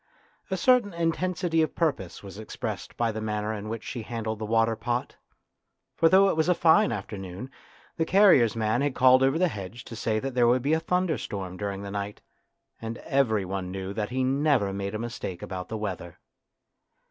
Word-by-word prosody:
A -, -, -1 dB
certain 245 Hz, -8 st, +3 dB
intensity 170 Hz, 0 st, 0 dB
of 155 Hz, -, -1 dB
purpose 140 Hz, -, -2 dB
was 100 Hz, +1 st, -9 dB
expressed 110 Hz, -, -6 dB
by 115 Hz, -1 st, +1 dB
the 110 Hz, 0 st, -5 dB
manner 105 Hz, 0 st, -2 dB
in 105 Hz, 0 st, -6 dB
which 115 Hz, 0 st, -5 dB
she 120 Hz, -, -5 dB
handled 110 Hz, -1 st, -4 dB
the 110 Hz, -, -4 dB
water 115 Hz, 0 st, +2 dB
pot. 120 Hz, +2 st, -3 dB, 0.8 s
For 165 Hz, -, +4 dB
though 195 Hz, +2 st, +6 dB
it 195 Hz, -, +1 dB
was 160 Hz, +2 st, +1 dB
a 180 Hz, -, +4 dB
fine 160 Hz, -6 st, +4 dB
afternoon 100 Hz, +2 st, -6 dB, 0.5 s
the 160 Hz, -, +1 dB
carrier's 185 Hz, -, +5 dB
man 110 Hz, +2 st, +1 dB
had 145 Hz, -2 st, 0 dB
called 130 Hz, 0 st, +6 dB
over 135 Hz, +3 st, +3 dB
the 180 Hz, +2 st, +3 dB
hedge 105 Hz, -, -7 dB
to 115 Hz, -, -9 dB
say 110 Hz, 0 st, -1 dB
that 135 Hz, +4 st, -3 dB
there 120 Hz, -1 st, +4 dB
would 125 Hz, +1 st, +3 dB
be 145 Hz, +3 st, +2 dB
a 160 Hz, -, +3 dB
thunderstorm 160 Hz, -, -2 dB
during 100 Hz, 0 st, -4 dB
the 100 Hz, -, -6 dB
night, 100 Hz, 0 st, -4 dB, 0.6 s
and 115 Hz, +1 st, -5 dB
every 120 Hz, -9 st, +1 dB
one 95 Hz, -1 st, -4 dB
knew 95 Hz, +1 st, -5 dB
that 105 Hz, 0 st, -3 dB
he 130 Hz, +1 st, -1 dB
never 135 Hz, -6 st, +2 dB
made 100 Hz, +1 st, -4 dB
a -, -, 0 dB
mistake 110 Hz, -6 st, -5 dB
about 90 Hz, -1 st, -6 dB
the 110 Hz, -, -3 dB
weather. 95 Hz, -5 st, -5 dB
115 Hz, 195 wpm, -27 LUFS, 105-145 Hz, 0.8 s, though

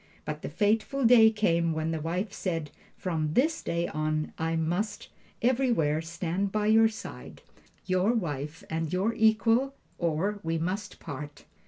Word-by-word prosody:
But -, -, -4 dB
the -, -, -5 dB
fateful 225 Hz, +5 st, +1 dB
day 230 Hz, -2 st, +8 dB
came 170 Hz, -7 st, +1 dB
when 160 Hz, +1 st, -1 dB
the 160 Hz, -1 st, -2 dB
wife 180 Hz, +6 st, -2 dB
said, 165 Hz, -8 st, -3 dB, 0.3 s
"From 155 Hz, -4 st, -2 dB
this 315 Hz, +6 st, +2 dB
day 170 Hz, 0 st, -1 dB
on 155 Hz, 0 st, -2 dB
I 165 Hz, 0 st, 0 dB
must 180 Hz, +6 st, -2 dB, 0.3 s
everywhere 235 Hz, -, +2 dB
stand 175 Hz, +4 st, -2 dB
by 210 Hz, 0 st, 0 dB
your 220 Hz, +1 st, +6 dB
side, 220 Hz, -, -9 dB, 0.4 s
your 185 Hz, +3 st, +2 dB
wife 155 Hz, -, -3 dB
and 160 Hz, -1 st, -2 dB
your 195 Hz, +5 st, +1 dB
equal, 225 Hz, +5 st, +3 dB, 0.2 s
or 175 Hz, +5 st, 0 dB
we 165 Hz, 0 st, -1 dB
must 185 Hz, +6 st, -3 dB
part." 145 Hz, +1 st, -8 dB
180 Hz, 150 wpm, -28 LUFS, 160-220 Hz, 0.4 s, day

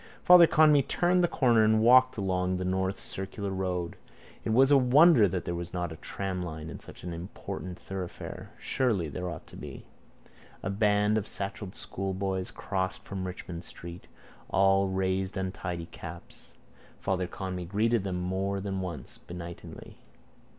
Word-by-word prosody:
Father 175 Hz, -2 st, +9 dB
Conmee 150 Hz, -3 st, +6 dB
turned 175 Hz, +6 st, +2 dB
the -, -, +5 dB
corner 120 Hz, -8 st, +3 dB
and 110 Hz, 0 st, +4 dB
walked 125 Hz, +3 st, +6 dB
along 90 Hz, -2 st, 0 dB
the 90 Hz, -, -3 dB
North 95 Hz, +1 st, -1 dB
Circular 100 Hz, +1 st, -4 dB
road. 90 Hz, -2 st, -2 dB, 0.5 s
It -, -, -3 dB
was 130 Hz, +5 st, +5 dB
a 140 Hz, -, +8 dB
wonder 135 Hz, -1 st, +6 dB
that 90 Hz, -1 st, -3 dB
there 85 Hz, -, -2 dB
was 85 Hz, +1 st, -5 dB
not 90 Hz, -2 st, -2 dB
a -, -, -6 dB
tramline 85 Hz, -3 st, -5 dB
in -, -, -8 dB
such -, -, -12 dB
an 90 Hz, -1 st, -4 dB
important 90 Hz, +1 st, -6 dB
thoroughfare. 95 Hz, +1 st, -7 dB
Surely, 110 Hz, -, 0 dB
there 90 Hz, +5 st, -4 dB
ought 85 Hz, -2 st, -7 dB
to -, -, -14 dB
be. -, -, -9 dB, 0.8 s
A 95 Hz, -, -1 dB
band 105 Hz, +1 st, +3 dB
of 105 Hz, -, -6 dB
satchelled 100 Hz, -1 st, -5 dB
schoolboys 95 Hz, -1 st, -3 dB
crossed 95 Hz, -1 st, -3 dB
from 95 Hz, -1 st, -5 dB
Richmond 90 Hz, -1 st, -7 dB
street. 85 Hz, 0 st, -9 dB, 0.4 s
All 95 Hz, 0 st, +4 dB
raised 95 Hz, +1 st, -1 dB
untidy 90 Hz, -3 st, -3 dB
caps. 85 Hz, 0 st, -11 dB, 0.5 s
Father 95 Hz, -2 st, -1 dB
Conmee 90 Hz, -1 st, -5 dB
greeted 110 Hz, +2 st, +2 dB
them 95 Hz, -2 st, -2 dB
more 95 Hz, +2 st, -1 dB
than 95 Hz, -1 st, -3 dB
once 85 Hz, -6 st, -7 dB
benignly. 85 Hz, -1 st, -9 dB
95 Hz, 155 wpm, -29 LUFS, 90-105 Hz, 0.8 s, Father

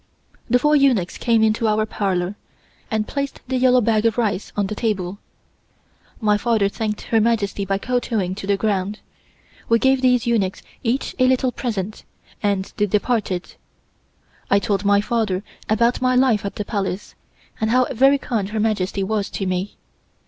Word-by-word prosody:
The 245 Hz, -, +5 dB
four 295 Hz, +4 st, +3 dB
eunuchs 255 Hz, -11 st, +2 dB
came 230 Hz, -2 st, +3 dB
into 220 Hz, +1 st, +2 dB
our 215 Hz, 0 st, +2 dB
parlor, 190 Hz, -3 st, -1 dB, 0.6 s
and 215 Hz, -1 st, -1 dB
placed 280 Hz, -1 st, -3 dB
the 260 Hz, 0 st, 0 dB
yellow 255 Hz, 0 st, +4 dB
bag 220 Hz, -1 st, +2 dB
of 225 Hz, -, -1 dB
rice 210 Hz, -5 st, -1 dB
on 205 Hz, -, +2 dB
the 205 Hz, -, -4 dB
table. 200 Hz, -4 st, -2 dB, 1.0 s
My 210 Hz, -2 st, +2 dB
father 220 Hz, -3 st, +2 dB
thanked 210 Hz, 0 st, -3 dB
Her 225 Hz, -1 st, +1 dB
Majesty 210 Hz, -3 st, 0 dB
by 195 Hz, 0 st, 0 dB
kowtowing 225 Hz, -5 st, -1 dB
to 195 Hz, 0 st, -7 dB
the 200 Hz, -1 st, +2 dB
ground. 205 Hz, -1 st, -1 dB, 0.7 s
We 230 Hz, -, +5 dB
gave 265 Hz, +2 st, +2 dB
these 250 Hz, -2 st, +3 dB
eunuchs 210 Hz, -6 st, 0 dB, 0.2 s
each 250 Hz, +3 st, -1 dB
a 255 Hz, -, +5 dB
little 255 Hz, 0 st, +2 dB
present, 215 Hz, -4 st, -4 dB, 0.4 s
and 200 Hz, -2 st, -1 dB
they 210 Hz, -, +2 dB
departed. 205 Hz, -3 st, -1 dB, 1.0 s
I 200 Hz, -, +5 dB
told 200 Hz, -1 st, 0 dB
my 200 Hz, 0 st, +4 dB
father 210 Hz, -4 st, -1 dB, 0.3 s
about 235 Hz, +3 st, +2 dB
my 255 Hz, 0 st, +2 dB
life 250 Hz, -5 st, +3 dB
at 200 Hz, -, -4 dB
the 210 Hz, -, -4 dB
Palace, 200 Hz, -2 st, -3 dB, 0.5 s
and 220 Hz, -, 0 dB
how 255 Hz, +2 st, +4 dB
very 270 Hz, +3 st, +4 dB
kind 225 Hz, -8 st, -2 dB
Her 220 Hz, +1 st, -3 dB
Majesty 200 Hz, -3 st, 0 dB
was 205 Hz, 0 st, -1 dB
to 195 Hz, -, -4 dB
me. 185 Hz, +2 st, -2 dB
215 Hz, 170 wpm, -21 LUFS, 200-240 Hz, 1.0 s, The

